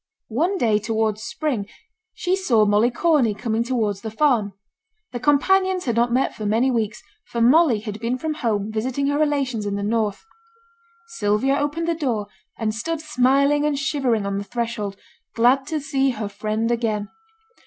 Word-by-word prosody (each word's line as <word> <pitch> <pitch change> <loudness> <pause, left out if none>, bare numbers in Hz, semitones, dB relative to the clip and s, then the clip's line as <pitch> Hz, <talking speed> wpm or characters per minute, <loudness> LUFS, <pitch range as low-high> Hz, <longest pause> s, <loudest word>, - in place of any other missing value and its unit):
One 345 - +1
day 220 - +2
towards 220 0 -1
spring, 235 -4 -3 0.5
she 370 -2 0
saw 245 - +3
Molly 210 +3 +3
Corney 255 -5 +2
coming 225 +1 -1
towards 220 -5 -1
the 220 - -5
farm. 220 -4 +1 0.6
The 245 - -4
companions 370 +8 +2
had 235 -4 0
not 235 +1 +2
met 255 +3 +1
for 220 - -8
many 230 +5 +2
weeks, 220 -3 -2 0.2
for 235 - -4
Molly 250 -1 +4
had 215 -1 -6
been 235 +3 -1
from 315 +3 -3
home 220 -7 -1
visiting 250 +5 -1
her 285 +1 0
relations 275 -8 0
in 200 - -2
the 200 - -3
north. 215 - -1 0.8
Sylvia 265 - +1
opened 295 +4 -1
the 335 - +2
door, 250 -10 -1 0.3
and 220 -2 -1
stood 325 +9 -3
smiling 280 0 +2
and 300 -1 +1
shivering 270 -7 0
on 200 0 -2
the - - -4
threshold, 220 -3 -4 0.4
glad 250 +4 +3
to 315 -2 -2
see 275 -1 0
her 220 -4 -3
friend 215 +3 -2
again. 220 -3 -1
235 Hz, 170 wpm, -22 LUFS, 215-285 Hz, 0.8 s, Molly